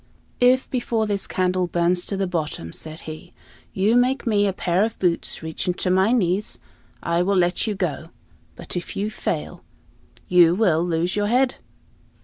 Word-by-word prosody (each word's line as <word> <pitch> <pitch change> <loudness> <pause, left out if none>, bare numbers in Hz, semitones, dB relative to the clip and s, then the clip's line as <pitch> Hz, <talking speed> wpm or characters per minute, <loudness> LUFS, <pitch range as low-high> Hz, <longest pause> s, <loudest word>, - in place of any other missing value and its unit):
"If, 250 +1 +4
before 235 -3 0
this 205 -2 -2
candle 185 0 0
burns 175 +1 +1
to 195 - -2
the 195 - 0
bottom," 155 - -4
said 155 0 -7
he, 155 0 -9 0.4
"you 205 +5 +2
make 255 +2 +2
me 205 -3 +2
a - - +1
pair 180 0 0
of 225 0 -2
boots 175 -3 -1
reaching 160 +2 -2
to 180 - -1
my 190 +4 +3
knees, 205 -3 +1 0.5
I 170 +1 +1
will 195 +3 +1
let 175 +4 +1
you 210 - -1
go; 165 -4 -3 0.5
but - - -6
if 175 - -5
you 205 +2 -1
fail, - - -4 0.6
you 175 -1 +5
will 175 -6 +2
lose 175 +1 -1
your 205 0 0
head." 255 +3 +2
185 Hz, 170 wpm, -23 LUFS, 175-215 Hz, 0.6 s, you